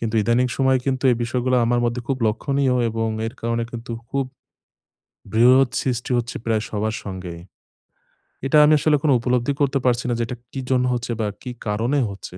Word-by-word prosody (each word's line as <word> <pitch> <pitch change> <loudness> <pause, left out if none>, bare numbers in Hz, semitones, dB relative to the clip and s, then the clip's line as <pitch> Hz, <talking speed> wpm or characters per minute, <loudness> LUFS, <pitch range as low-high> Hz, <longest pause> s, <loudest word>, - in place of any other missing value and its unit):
কিন্তু 115 -1 -3
ইদানীং 120 +4 +2
সময়ে 130 -1 +3
কিন্তু 130 0 -1
এই 120 - +2
বিষয়গুলা 125 +2 0
আমার 120 0 +2
মধ্যে 120 +1 -1
খুব 135 - 0
লক্ষণীয় 130 +4 +1
এবং 115 0 -1 0.2
এর 115 - -6
কারণে 115 0 -1
কিন্তু 115 0 -7 0.2
খুব 140 -1 0 1.1
বিরোধ 125 +3 +6
সৃষ্টি 125 -1 -2
হচ্ছে 120 0 -2
প্রায় 110 -2 +1
সবার 110 +1 -2
সঙ্গেই। 90 -3 -7 1.1
এটা 135 +3 +3
আমি 155 - +5
আসলে 155 0 +3
কোনো 150 -3 +4
উপলব্ধি 125 +3 0
করতে 140 0 +2
পারছি 125 0 +2
না। - - +1
যে 115 - +1
এটা 125 - -6
কি 135 - -5
জন্য 125 -1 +2
হচ্ছে 120 0 -3
বা 110 - 0
কি 125 - -6 0.2
কারণে 115 +7 0
হচ্ছে। 100 -2 -9
120 Hz, 185 wpm, -22 LUFS, 115-130 Hz, 1.1 s, বিরোধ